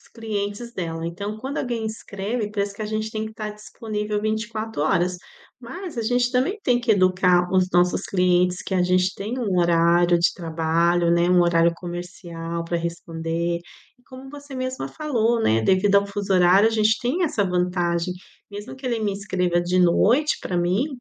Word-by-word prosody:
os - - -23
clientes 220 +1 -4
dela. 165 -4 -4
Então 200 +5 -5
quando 265 +5 -4
alguém 235 -3 -2
escreve, 215 0 -4
parece 200 -1 -2
que 215 - -13
a 210 - -3
gente 215 0 -3
tem 215 0 -3
que 220 - -10
tá 215 -1 -5
disponível 210 0 -4
24 220 -2 -3
horas, 180 +2 +1 0.4
mas 320 +4 -8
a - - 0
gente 245 +2 +1
também 295 +12 +1
tem 245 -1 +2
que 235 -2 +2
educar 180 -2 +3
os 185 -1 +3
nossos 175 +1 +2
clientes, 180 -1 +1
que 190 - -4
a 180 - +3
gente 180 +1 +2
tem 220 +6 -5
um 200 -7 0
horário 170 0 +3
de 170 - +2
trabalho, 170 +1 +1
né, 170 +1 +3
um 180 -1 +5
horário 170 0 +3
comercial 170 -1 -6
pra 170 +1 -2
responder, 170 0 -3 0.4
e - - -29
como 260 +1 -11
você 285 -1 -10
mesma 255 0 -3
falou, 235 -7 0
né, 110 +1 +3
devido 190 - +3
ao 200 0 +3
fuso 200 -1 -3
horário 185 +4 +5
a - - -2
gente 220 0 +3
tem 310 +9 0
essa 220 -10 0
vantagem, 180 -1 0 0.3
mesmo 205 +3 -8
que 265 -1 -8
ele 235 -2 -1
me 205 -2 0
escreva 180 -3 0
de 180 +1 +1
noite 235 - +3
pra 180 - -3
mim, 180 +10 +1
195 Hz, 185 wpm, -23 LUFS, 175-225 Hz, 0.4 s, um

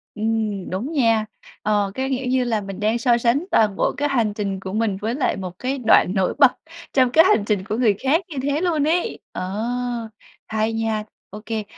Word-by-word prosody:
Ừm, 215 -3 -2
đúng 215 - -3
nha. 230 -7 +2 0.4
Ờ, 205 -2 +1
cái 265 0 -2
kiểu 260 -1 -2
như 255 0 +2
là, 225 -3 0
mình 195 -1 -7
đang 215 +3 +1
so 235 0 +3
sánh 240 +7 +1
toàn 210 -3 +3
bộ - - +1
cái 290 +1 0
hành 230 -6 +1
trình 200 -2 -3
của 190 0 -7
mình 215 -3 0
với 225 +3 -1
lại 280 - 0
một 185 -1 -7
cái 265 +2 -2
đoạn 250 - +4
nổi 190 -2 +1
bật 275 -4 +7 0.4
trong 255 -2 +3
cái 320 +5 +7
hành 375 - +4
trình 205 -3 0
của 215 +1 -2
người 230 -5 +3
khác 285 +6 +2
như 300 - -7
thế 285 +2 0
luôn 320 -5 +1
ấy! 345 +3 0
Ờ, 185 0 -4 1.0
hay 220 +1 -1
nha, 225 -1 -1 0.3
ô 210 +2 -9
kê, 220 -1 -3
225 Hz, 215 wpm, -22 LUFS, 210-265 Hz, 1.0 s, bật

